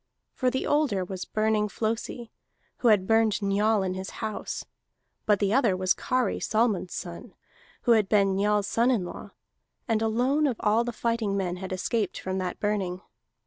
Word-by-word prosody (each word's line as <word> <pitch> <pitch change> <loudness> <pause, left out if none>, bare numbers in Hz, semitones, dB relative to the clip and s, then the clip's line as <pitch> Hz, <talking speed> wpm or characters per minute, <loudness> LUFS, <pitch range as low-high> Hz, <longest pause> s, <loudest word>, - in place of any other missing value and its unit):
For 255 - +1
the 260 +1 -2
older 270 -11 +1
was 185 0 -6
Burning 215 -1 +1
Flosi, 230 +2 -3 0.5
who 245 - 0
had 210 -4 +5
burned 225 0 +3
Njal 205 +1 +2
in 185 -1 -1
his 190 +1 -5
house; 215 -2 -4 0.6
but 210 -1 +5
the 200 +1 +1
other 230 -8 +3
was 185 0 +2
Kari 255 -1 -1
Solmund's 215 -5 0
son, 170 -1 -7 0.5
who 240 - +3
had 215 -4 +4
been 200 -2 +3
Njal's 205 +1 +2
son 230 +4 +2
in 225 -8 +1
law, - - -8 0.6
and 225 -2 +1
alone 250 +7 +2
of 255 - 0
all 215 +3 +2
the 240 - -3
fighting 230 -3 -1
men 180 -2 -2
had 190 +1 -7
escaped 190 +2 -1
from 190 0 -3
that 180 -1 -4
burning. 195 -3 -1
210 Hz, 175 wpm, -27 LUFS, 190-230 Hz, 0.6 s, had